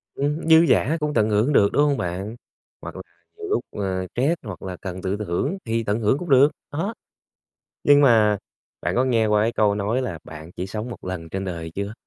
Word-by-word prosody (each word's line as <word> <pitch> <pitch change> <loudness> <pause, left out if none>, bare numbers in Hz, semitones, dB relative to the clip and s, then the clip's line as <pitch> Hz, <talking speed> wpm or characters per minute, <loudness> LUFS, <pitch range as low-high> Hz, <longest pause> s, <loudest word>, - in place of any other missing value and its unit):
Ừm, 150 +3 -1
dư 160 +1 +7
dả 150 +1 +2
cũng 150 0 -1
tận 110 -5 +2
hưởng 110 +8 +2
được, 100 -6 +5
đúng 145 - +4
hông 145 -2 +2
bạn? 95 +6 -4 0.5
Hoặc - - -8
là - - -6 0.4
nhiều 420 - -6
lúc, 420 - 0
ơ, 95 -2 -3
stress, 145 +8 +1
hoặc 100 -5 -8
là 95 -1 -6
cần 95 -1 -6
tự 95 +2 -2
thưởng 105 - -2
thì 115 0 -1
tận 105 +1 -1
hưởng 115 +5 +2
cũng 175 -1 -7
được, 135 +2 +6 0.2
đó. 180 +10 -2 0.9
Nhưng 145 0 +6
mà 110 -6 +5 0.4
bạn - - -1
có 125 - +3
nghe 115 -4 +2
qua 105 0 +3
cái 115 - 0
câu 105 -3 +2
nói 105 +6 -1
là 90 -10 -4
"Bạn 80 +1 -10
chỉ 90 - -3
sống 105 +4 -5
một 115 - -9
lần 90 -3 -5
trên 95 +3 -4
đời" 85 -3 -5
chưa? 100 +1 -3
110 Hz, 225 wpm, -23 LUFS, 95-140 Hz, 0.9 s, dư